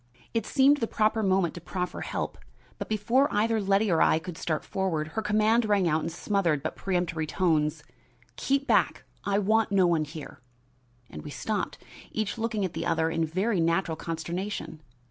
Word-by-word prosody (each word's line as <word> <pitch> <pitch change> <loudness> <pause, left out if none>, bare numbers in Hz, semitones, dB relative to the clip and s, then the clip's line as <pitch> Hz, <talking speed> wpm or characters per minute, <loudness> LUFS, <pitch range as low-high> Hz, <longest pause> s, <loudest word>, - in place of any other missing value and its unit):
It 225 -2 -1
seemed 275 +2 +5
the 230 - -1
proper 220 +1 +1
moment 190 -4 +2
to 175 - -8
proffer 180 +1 -4
help, - - -4 0.4
but - - -5
before 230 +6 +2
either 220 +1 +1
Letty 200 +1 +2
or 165 - +3
I - - +5
could 160 +1 -6
start 160 -3 -2
forward, 165 -5 -1
her 220 - -3
command 215 +2 +3
rang 205 -4 +2
out 160 0 +2
in 165 - -2
smothered 170 -4 0
but 155 - -3
peremptory 175 -4 -1
tones: 155 -3 +1 0.5
"Keep 275 +1 0
back! - - +2 0.2
I 200 0 +1
want 215 +2 +2
no 195 -2 +4
one 165 -3 +2
here!" 150 -3 -9 0.7
and 75 - -9
we - - -8
stopped, - - -3 0.3
each 220 +1 -2
looking 220 -3 -1
at 180 - -4
the - - -3
other 165 -1 +1
in 165 0 0
very 190 +5 0
natural 165 0 +1
consternation. 165 +1 -4
190 Hz, 180 wpm, -27 LUFS, 165-215 Hz, 0.7 s, seemed